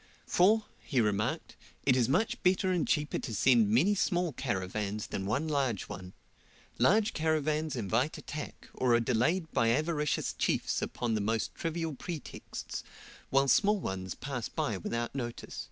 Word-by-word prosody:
"For," 210 +5 +4
he 135 - -1
remarked, 110 +8 0 0.3
"it 130 - +5
is 125 -2 +2
much 225 - +1
better 185 +1 +3
and 180 -3 +1
cheaper 150 -1 0
to 115 - -4
send 115 -1 +4
many 145 - +4
small 175 -4 +1
caravans 105 -3 -2
than 95 0 -4
one 130 +9 0
large 135 -9 0
one. 95 -2 -8 0.7
Large 205 - +4
caravans 155 -1 0
invite 120 +6 0
attack, 150 0 -7
or 125 -2 +3
are - - +4
delayed 140 +9 +1
by 115 - +2
avaricious 150 +4 0
chiefs - - 0
upon 120 -2 -2
the 110 - +1
most 110 +1 -1
trivial 165 -1 -3
pretexts, 160 +3 -6 0.5
while 135 +1 +3
small 210 - +4
ones 95 - -4
pass 130 -4 -4
by 110 - -1
without 115 +6 -3
notice." 120 -3 -5
135 Hz, 155 wpm, -31 LUFS, 115-160 Hz, 0.7 s, it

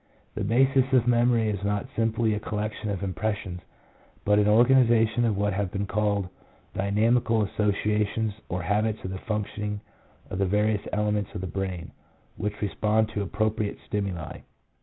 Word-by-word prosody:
The 105 - -3
basis 130 +4 +3
of 125 -3 +5
memory 120 -2 +3
is 100 -1 -4
not 100 0 0
simply 115 0 +1
a 105 - -1
col 105 0 -4
lection 105 0 -3
of 100 -1 -3
impressions, 95 -1 -3 0.6
but 105 0 +4
an 105 - +3
organization 120 0 +4
of 110 -4 +1
what 105 0 +1
have 100 -1 -1
been 100 -1 -2
called 100 -1 0 0.5
"dynamical 110 +3 +2
associations," 105 +2 0 0.2
or 90 0 -2
habits 105 +4 0
of 95 - -4
the 95 - -5
functioning 105 -1 -3 0.5
of 90 - -3
the 100 - +3
various 105 +2 +2
elements 105 -1 -1
of - - -3
the - - -3
brain, 95 -2 -4 0.4
which 105 0 -3
respond 105 +2 +1
to 105 -2 -3
appropriate 105 +1 -1
stimuli. 95 -6 -3
105 Hz, 160 wpm, -26 LUFS, 100-110 Hz, 0.6 s, of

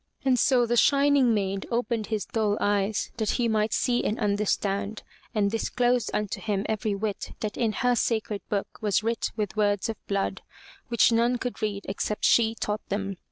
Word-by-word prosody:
And 255 -2 +3
so 245 -1 +4
the 240 +1 0
shining 280 -2 +4
maid 195 -2 -1
opened 235 -3 -1
his 215 -1 -2
dull 215 -2 0
eyes 205 0 0
that 220 -2 -1
he 240 -2 +1
might 215 -1 +1
see 245 -1 +1
and 215 - -1
under 205 -1 +1
stand, 200 +2 -1 0.3
and 200 -2 +2
disclosed 245 +2 +1
unto 210 -2 -2
him 205 -2 -1
every 215 -1 -1
whit 205 0 -4
that 210 -2 -3
in 230 -3 +1
her 245 +4 +1
sacred 220 -3 -1
book 200 -1 -3
was 210 0 +1
writ 230 +1 -1
with 210 -1 -3
words 205 0 +1
of 225 - -7
blood, 200 -1 -1 0.5
which 235 -1 +4
none 235 +2 +2
could 245 -1 -5
read 205 -2 -2
except 205 +2 -2
she 225 -1 +4
taught 210 -1 -2
them. 195 -1 -2
215 Hz, 185 wpm, -26 LUFS, 205-235 Hz, 0.5 s, so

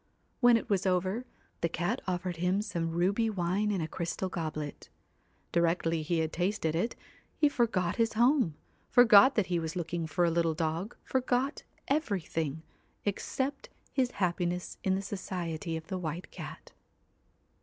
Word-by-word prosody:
When 245 -2 +7
it 230 - -5
was 195 -3 +1
over, 185 +6 +1 0.3
the 170 - 0
cat 175 +10 -1
offered 180 -1 -2
him 180 +4 +1
some 170 -6 -2
ruby 190 +7 +1
wine 195 +1 0
in 195 -4 0
a 160 - -1
crystal 170 +3 -3
goblet. 155 -4 -5 0.6
Directly 165 -1 +2
he 165 +2 0
had 160 0 -2
tasted 175 -3 0
it, 180 +9 0 0.4
he 300 - +5
forgot 220 -10 +1
his 230 -1 +2
home, 240 - +3 0.3
forgot 245 +2 +8
that 210 - +3
he 175 -1 0
was 160 0 -4
looking 170 -1 -2
for 165 +3 +2
a 170 - +2
little 165 -1 +1
dog, 165 +6 -2
forgot 260 +2 0 0.3
everything, 165 - -1 0.4
except 265 +7 -2 0.2
his 260 -3 +2
happiness 180 -1 -1
in 190 -1 +2
the 195 - -2
society 170 -5 -3
of 160 - -8
the 190 0 -4
White 170 +1 -5
Cat. - - -9
180 Hz, 155 wpm, -31 LUFS, 165-215 Hz, 0.6 s, forgot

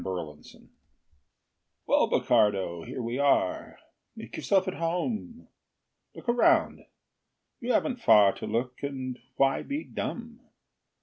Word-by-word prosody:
Bokardo 80 -5 -7 1.2
Well, - - +3
Bokardo, 95 -5 +1
here 125 - -5
we 120 +3 -3
are; 140 -9 +1 0.4
Make - - -9
yourself 190 -1 +1
at 185 - -2
home. 215 +9 -3 0.7
Look - - -12
around 320 +7 +3 0.8
you 250 0 -2
haven't 250 -1 0
far 105 - +6
To - - -6
look 125 +2 -3
and 130 -3 -5 0.2
why 135 0 +2
be 290 +2 -4
dumb? 235 0 -6
140 Hz, 115 wpm, -28 LUFS, -, 1.2 s, far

